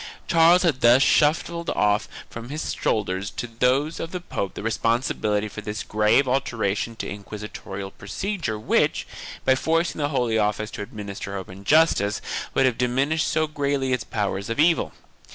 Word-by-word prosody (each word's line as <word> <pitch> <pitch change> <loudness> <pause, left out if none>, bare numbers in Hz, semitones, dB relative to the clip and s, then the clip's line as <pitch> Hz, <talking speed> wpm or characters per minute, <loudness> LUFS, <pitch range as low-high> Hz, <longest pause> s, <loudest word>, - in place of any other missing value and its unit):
2 - - -19
Charles 170 +2 +6
had 150 -7 +1
thus 120 +3 +6
shuffled 165 +4 +2
off 105 0 +2 0.2
from 115 +1 -9
his 150 +2 -3
shoulders 100 -2 -1
to - - -5
those 125 +6 0
of 165 - -4
the 180 - -4
pope 100 - -4
the - - -6
responsibility 110 -2 0
for 105 - -8
this 105 +1 -4
grave 105 +6 +3
alteration 115 -4 -1
in - - -4
inquisitorial 100 -1 -7
procedure 165 - -4
which, 105 - +1 0.4
by 130 - +5
forcing 165 +5 0
the 145 - +1
Holy 120 -6 +1
Office 105 0 0
to - - -6
administer 100 -1 -6
open 95 +1 -9
justice, 145 -7 +3 0.4
would 135 - +4
have 125 -3 +1
diminished 135 +6 +1
so 155 - +1
greatly 140 -3 -1
its 125 - -1
powers 100 0 -3
of 115 - -3
evil. 165 +2 +3
120 Hz, 165 wpm, -24 LUFS, 105-150 Hz, 0.4 s, Charles